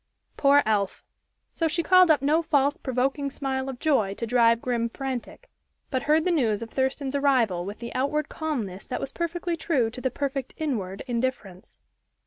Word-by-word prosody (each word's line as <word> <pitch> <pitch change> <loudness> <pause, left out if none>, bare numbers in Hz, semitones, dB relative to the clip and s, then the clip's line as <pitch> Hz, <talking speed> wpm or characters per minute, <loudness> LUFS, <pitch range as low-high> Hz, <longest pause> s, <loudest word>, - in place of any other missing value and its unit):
Poor 285 0 +5
elf! 205 -3 0 0.5
So 330 - 0
she 335 +2 0
called 370 -1 +6
up 295 -3 +4
no 305 +4 +3
false, 290 -3 +2
provoking 270 +2 -1
smile 270 -1 -3
of 260 - -6
joy, 235 -10 +1
to 230 - -4
drive 230 -1 +4
Grim 235 -1 -1
frantic, 270 - -6 0.4
but 260 -2 0
heard 305 +4 +2
the 365 - +2
news 230 -9 +1
of 225 - -10
Thurston's 265 +1 -1
arrival 245 -11 +2
with 205 +2 -6
the 235 0 -7
outward 280 +3 0
calmness 230 - -4
that 250 - -3
was 275 - -5
perfectly 340 +1 -2
true 280 -8 0
to 250 - -8
the 260 - 0
perfect 275 0 -4
inward 210 -11 -3
indifference. 235 -7 -4
265 Hz, 175 wpm, -26 LUFS, 230-300 Hz, 0.5 s, called